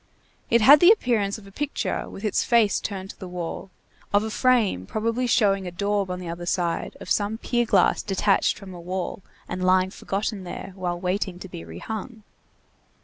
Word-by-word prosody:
It 235 0 +4
had 280 +7 +9
the 350 - +7
appearance 230 - +2
of 215 - -14
a 195 - -13
picture 290 +7 -3
with 200 - -8
its 210 - +1
face 230 -4 +3
turned 195 -2 -5
to - - -21
the 185 - -7
wall, 180 +1 -5 0.4
of 205 +1 +3
a 220 - -4
frame 220 - +2
probably 230 +3 -1
showing 195 -5 +2
a - - -5
daub 200 +1 -1
on 180 0 -3
the 180 - -7
other 170 +1 -6
side, 175 -2 -1
of - - -10
some 210 +1 +1
pier 240 0 0
glass - - +3
detached 195 0 +1
from 195 -3 -10
a 175 - -9
wall 185 +2 -4 0.3
and 180 +1 -4
lying 185 0 +3
forgotten 200 0 -3
there 185 +1 -7
while 180 -2 -3
waiting 185 0 -2
to 190 - -9
be 85 - -8
rehung. 215 - -7
195 Hz, 195 wpm, -24 LUFS, 180-220 Hz, 0.4 s, had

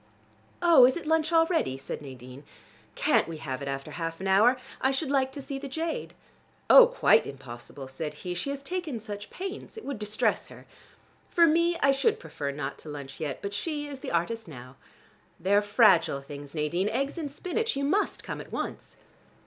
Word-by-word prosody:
"Oh, 325 -8 +8
is 260 - 0
it 335 - -7
lunch 320 +1 +1
already?" 325 - +2
said 135 - -6
Nadine. 130 0 -10 0.5
"Can't - - +2
we 165 -1 -6
have 130 -3 -5
it 140 - -5
after 135 0 -4
half 165 -1 -4
an 190 - -4
hour? 215 +7 +5 0.2
I 265 - +3
should 270 +1 -1
like 265 -2 +2
to 280 - -7
see 275 -1 -5
the 280 - -6
jade." 320 +4 -4 0.6
"Oh, - - +10
quite - - +4
impossible," 135 0 -9
said 150 +3 -5
he. 180 - -5
"She 175 +10 -3
has 280 0 -4
taken 325 -6 -3
such 205 -1 -7
pains. 385 +4 -7
It 445 - -8
would 275 -6 -4
distress 210 0 0
her. - - -13 0.6
For 340 - +5
me, 335 +2 +3
I 275 - +6
should 430 +12 +1
prefer 145 - -5
not 140 -1 -5
to 155 - -11
lunch 140 -2 -8
yet, 145 -4 -4
but 200 0 -4
she 295 +6 -2
is 280 -2 -8
the - - -6
artist 210 +7 -1
now. 130 -3 -11 0.6
They 190 +4 0
are 205 - +6
fragile 190 - +4
things, 145 +1 -10
Nadine, 170 +6 0
eggs 275 +8 -2
in 300 -3 -3
spinach. 370 +10 -2
You 280 - -2
must 380 +9 0
come - - -5
at - - -13
once." - - -5
220 Hz, 195 wpm, -28 LUFS, -, 0.6 s, Oh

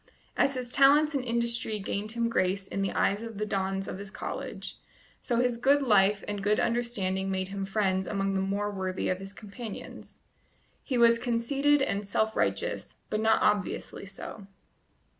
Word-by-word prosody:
As 275 - +2
his 250 -1 -4
talents 290 +3 +5
and 275 -3 0
industry 235 -2 -1
gained 205 +2 -3
him 235 0 +1
grace 190 -3 0
in 195 - -3
the 195 - 0
eyes 200 +2 +1
of 225 -2 -7
the 215 - -1
dons 195 -1 -1
of - - -5
his 200 0 -7
college, - - -6 0.4
so 240 - -1
his 245 0 +2
good 275 +4 +4
life 205 -4 +4
and 205 -1 -3
good 210 +2 +2
understanding 200 -5 0
made 190 0 -2
him 195 0 -4
friends 190 -2 0
among 195 -1 0
the 190 - +1
more 200 +2 -1
worthy 190 -2 -2
of 185 - 0
his 195 0 -7
companions. 210 +1 -9 0.6
He 260 - -2
was 235 -1 +6
conceited 270 +5 +2
and 200 -5 -1
self 220 +2 0
righteous, - - -1 0.2
but 215 - 0
not 220 0 +3
obviously 205 -1 0
so. 195 +1 -9
210 Hz, 175 wpm, -29 LUFS, 195-235 Hz, 0.6 s, was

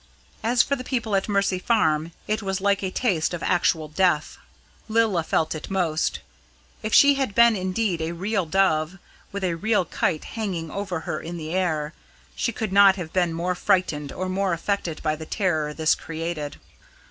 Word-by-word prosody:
As 240 +2 +3
for 280 - 0
the 255 - -7
people 235 -5 -1
at 195 +2 0
Mercy 200 -2 +1
Farm, 160 -7 +1 0.2
it 215 +1 0
was 195 -1 -2
like 200 0 +1
a 190 - -1
taste 185 -5 0
of 170 - -7
actual 165 -3 +1
death. 175 0 +1 0.5
Lilla 220 -5 +2
felt 160 0 0
it 155 - -7
most. 170 -5 0 0.6
If 215 - -3
she 285 +4 +7
had 270 -7 -2
been 235 -1 +6
indeed 185 -1 -1
a 160 +1 -2
real 190 +1 -1
dove, 160 -1 +1 0.3
with 200 -1 -5
a 180 -2 +1
real 210 +1 +1
kite 155 0 -1
hanging 185 -8 -4
over 190 -4 -3
her 155 - -3
in 170 +1 -6
the 160 0 -5
air, 160 -5 -1 0.4
she 235 - 0
could 215 -3 -4
not 200 -1 +7
have 175 -4 -7
been 175 -2 +2
more 170 +2 -1
frightened 155 -6 0
or 185 - -4
more 190 0 0
affected 170 -1 -2
by 155 -1 +1
the 160 0 -9
terror 160 -7 0
this 155 +1 +2
created. 165 -2 -5
185 Hz, 180 wpm, -24 LUFS, 160-200 Hz, 0.6 s, she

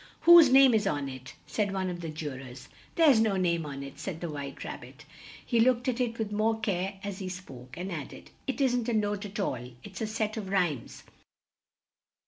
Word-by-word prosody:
"Whose 340 -4 +9
name 265 -1 +7
is 215 -2 +2
on 145 -1 -1
it?" 130 -1 -9
said 205 -2 -1
one 190 -1 -2
of 175 -1 -4
the 165 - -5
ju 155 -1 -5
rors. 130 0 -10 0.3
"There's 300 -8 +6
no 215 -3 +2
name 170 -4 0
on 140 -1 -6
it," 140 -1 -10
said 180 -5 -5
the 170 -2 -4
White 140 -2 -6
Rab - - -6
bit; - - -14 0.4
he 235 - +1
looked 245 +1 +3
at 255 0 0
it 230 -2 -1
with 220 -2 -3
more 220 +2 +1
care 195 -2 -2
as 200 -1 -5
he 190 -2 -4
spoke, 130 -9 -10
and 185 +2 -5
add 155 -5 -5
ed, - - -13 0.2
"it 270 - -2
isn't 245 -3 +1
a - - 0
note 205 -1 0
at 205 +2 -7
all; 125 -10 -2
it's 200 0 -9
a 220 - -1
set 215 0 -2
of 200 -3 -5
rhymes." 175 -11 -1
195 Hz, 220 wpm, -29 LUFS, 155-225 Hz, 0.4 s, Whose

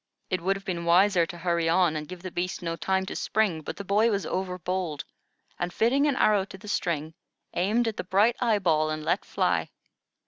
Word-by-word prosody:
It 185 -2 0
would 195 +3 +1
have 195 - -9
been 175 -2 -3
wiser 175 0 +4
to 175 - -8
hurry 170 -1 0
on 170 -2 +3
and 150 -1 -4
give 180 +1 -9
the 185 - -5
beast 180 +1 -3
no 165 -1 -2
time 190 +3 0
to - - -6
spring; 200 -7 0
but - - -6
the 200 - -5
boy 210 +4 +3
was 200 -3 -1
over 185 -1 -2
bold, 180 -5 -3 0.5
and, 175 0 -2
fitting 265 +9 +2
an 285 - +1
arrow 210 -5 +3
to 195 - -10
the 210 +2 -13
string, 160 -6 -2 0.4
aimed 220 +6 +1
at 220 - -3
the - - -2
bright 200 +6 +3
eye 230 -4 +2
ball 155 -5 +2
and 155 0 -4
let - - +1
fly. - - 0
185 Hz, 220 wpm, -27 LUFS, 170-205 Hz, 0.5 s, wiser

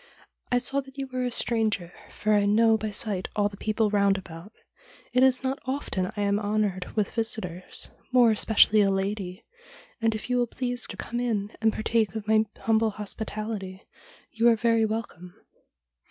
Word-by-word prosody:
' - - -53
I 245 - +4
saw 270 +3 +1
that 270 0 -16
you 275 - -2
were 255 0 -1
a - - 0
stranger, 215 -7 0 0.2
for 215 0 0
I 205 -1 +3
know 225 +2 +4
by 220 0 -2
sight 205 -2 0
all 205 -1 +2
the 200 - -11
people 215 +1 0
round 200 -1 +3
about. 180 +1 -10 0.6
It 250 - +4
is 260 -1 +4
not 265 +1 -1
often 260 -9 -2
I - - -1
am 200 0 +1
honoured 205 -3 -1
with 210 -3 0
visitors, 205 -6 -4 0.2
more 245 -3 +6
especially 215 0 +5
a 200 - +3
lady, 195 -1 -3 0.6
and 225 -1 +2
if 215 - -6
you 250 0 +1
will 240 - +1
please 245 +1 -2
to - - -8
come 240 - -4
in 220 -4 -2
and 220 0 +4
partake 220 0 0
of 215 -1 -5
my 220 0 +4 0.2
humble 225 0 +2
hospitality 210 -2 -5 0.4
you 230 +1 +2
are 230 - +5
very 230 0 +2
welcome.' 215 -5 -5
215 Hz, 185 wpm, -26 LUFS, 200-230 Hz, 0.6 s, more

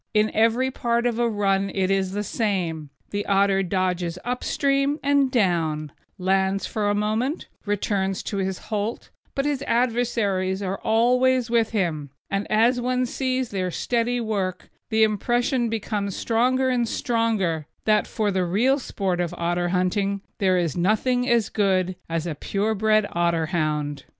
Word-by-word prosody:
In 215 0 +3
every 230 +4 +2
part 235 -1 0
of 240 -1 0
a 240 -1 +2
run 195 -2 +1
it 190 -1 +1
is 190 -1 0
the 205 +1 -2
same; 180 -9 -2 0.2
the 205 0 -1
otter 195 -1 +3
dodges 180 -2 -1
up 250 +1 -2
stream 275 +1 +1
and 280 -1 +3
down, 165 - 0 0.3
lands 190 +1 +1
for 210 -2 -1
a 205 - +1
moment, 220 - -1 0.2
returns 195 -2 -1
to 200 - -4
his 190 -1 -1 0.2
holt; 210 +3 -3 0.2
but 275 - 0
his 290 -2 0
adversaries 225 -6 0
are 190 0 -3
always 250 +2 +2
with 230 -2 +3
him, 165 -9 -1 0.2
and 195 +1 -2
as 235 +3 +3
one 250 +1 0
sees 255 0 -1
their 185 -2 -2
steady 240 +6 0
work 195 -5 -3 0.2
the 220 0 +3
impression 240 +3 +1
becomes 205 -3 -2
stronger 255 +3 +1
and 245 -2 +1
stronger 210 -10 0 0.2
that 215 -1 +3
for 215 -2 -1
the 185 -1 +1
real 235 +11 +2
sport 190 -7 -2
of 175 0 -3
otter 175 +1 0
hunting 195 +2 0 0.2
there 185 -2 +3
is 170 -5 0
nothing 245 +8 +1
as 235 -2 +3
good 185 -3 +1
as 165 -1 -1
the 170 -2 -3
pure 200 +8 -1
bred 215 0 +3
Otterhound. 155 -4 -1
205 Hz, 155 wpm, -24 LUFS, 185-235 Hz, 0.3 s, In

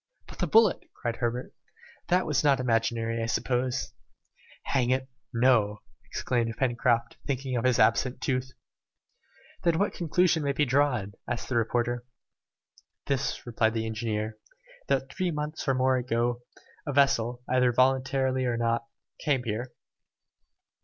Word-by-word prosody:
"But - - -13
the - - 0
bullet," 220 -3 +4
cried 120 -3 -3
Herbert. 120 +1 -2 0.5
"That 180 +1 +2
was 150 - +1
not 140 -3 +4
imaginary, 115 -1 0
I 115 - -1
suppose!" 125 +2 -1 0.7
"Hang 125 -3 +1
it, 130 +1 +1 0.2
no!" 115 -4 +2 0.2
exclaimed 115 -3 -1
Pencroft, 120 -2 +1
thinking 135 -2 -2
of 120 - -1
his 125 -2 +3
absent 125 +4 +3
tooth. 130 -1 -1 1.1
"Then 170 -2 +3
what 200 +3 +1
conclusion 175 0 +2
may 140 -1 0
be 150 - +2
drawn?" 125 -7 +1
asked 120 - -3
the 130 - -1
reporter. 120 +1 0 1.0
"This," 140 -3 -1
replied 115 -1 +1
the 110 0 -1
engineer, 110 -1 -3 0.5
"that 135 0 0
three 185 0 -1
months 150 -1 -4
or 135 - +3
more 130 0 +3
ago, 120 -1 0 0.5
a - - 0
vessel, 125 -3 +2
either 125 -1 +3
voluntarily 130 +1 +2
or 120 -2 0
not, 115 0 0 0.3
came 140 -5 +1
here." 120 +2 -3
125 Hz, 140 wpm, -28 LUFS, 115-135 Hz, 1.1 s, bullet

